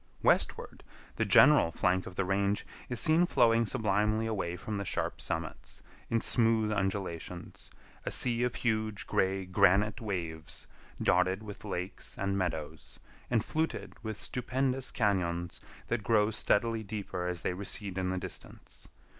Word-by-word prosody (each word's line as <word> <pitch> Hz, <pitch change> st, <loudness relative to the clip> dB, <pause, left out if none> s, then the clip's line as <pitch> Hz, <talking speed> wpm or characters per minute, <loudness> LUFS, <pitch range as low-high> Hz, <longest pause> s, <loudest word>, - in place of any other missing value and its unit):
Westward, -, -, +1 dB, 0.3 s
the -, -, +1 dB
general 145 Hz, -, +6 dB
flank 90 Hz, +2 st, +1 dB
of 90 Hz, -, -9 dB
the 100 Hz, -, 0 dB
range 100 Hz, +2 st, 0 dB, 0.2 s
is 125 Hz, -2 st, -2 dB
seen 160 Hz, +2 st, +4 dB
flowing 115 Hz, -5 st, +3 dB
sublimely 105 Hz, +1 st, +1 dB
away 95 Hz, -6 st, -2 dB
from 105 Hz, +4 st, -5 dB
the -, -, -2 dB
sharp 95 Hz, -, -2 dB
summits, 80 Hz, 0 st, -5 dB, 0.3 s
in 115 Hz, -, +2 dB
smooth 115 Hz, -2 st, +3 dB
undulations; 95 Hz, -4 st, -4 dB, 0.3 s
a -, -, -2 dB
sea 120 Hz, -2 st, +3 dB
of 125 Hz, -1 st, 0 dB
huge 110 Hz, -2 st, -1 dB
gray 95 Hz, 0 st, 0 dB
granite 100 Hz, +5 st, +3 dB
waves 85 Hz, -7 st, -5 dB, 0.3 s
dotted 90 Hz, +4 st, +2 dB
with 105 Hz, 0 st, -9 dB
lakes 95 Hz, -2 st, -5 dB
and 100 Hz, 0 st, -1 dB
meadows, 80 Hz, -5 st, -4 dB, 0.3 s
and 115 Hz, -3 st, +1 dB
fluted 155 Hz, -, -2 dB
with 110 Hz, -2 st, -5 dB
stupendous 130 Hz, +1 st, -1 dB
cañons 85 Hz, -5 st, 0 dB, 0.3 s
that 120 Hz, -2 st, -1 dB
grow 110 Hz, -1 st, +3 dB
steadily 115 Hz, +1 st, +1 dB
deeper 100 Hz, -4 st, -4 dB
as 90 Hz, -2 st, -2 dB
they 90 Hz, -, -1 dB
recede 100 Hz, 0 st, -3 dB
in 95 Hz, -1 st, -1 dB
the 95 Hz, -, -1 dB
distance. 90 Hz, -, -8 dB
100 Hz, 145 wpm, -31 LUFS, 90-115 Hz, 0.3 s, general